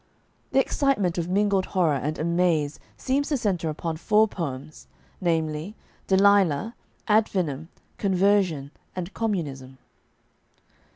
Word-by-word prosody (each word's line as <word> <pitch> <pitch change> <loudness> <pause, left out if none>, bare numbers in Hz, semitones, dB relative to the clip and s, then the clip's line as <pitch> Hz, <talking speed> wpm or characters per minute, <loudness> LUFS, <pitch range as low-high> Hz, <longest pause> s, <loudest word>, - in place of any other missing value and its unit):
The 270 - +3
excitement 235 - +1
of 170 +1 -3
mingled 200 0 +2
horror 170 -5 +4
and 145 +3 -2
amaze 165 -3 +1 0.2
seems 275 +2 0
to 290 - +1
center 185 -8 -1
upon 160 +1 -3
four 215 +5 +3
poems, 145 - -6 0.3
namely: 160 +2 -1 0.3
"Delilah," 195 -1 +3 0.3
"Ad 215 0 +4
Finem," 160 -5 -2 0.3
"Conversion," 190 -7 +2 0.2
and 185 +1 -5
"Communism." 140 - -3
180 Hz, 110 wpm, -25 LUFS, 155-205 Hz, 0.3 s, horror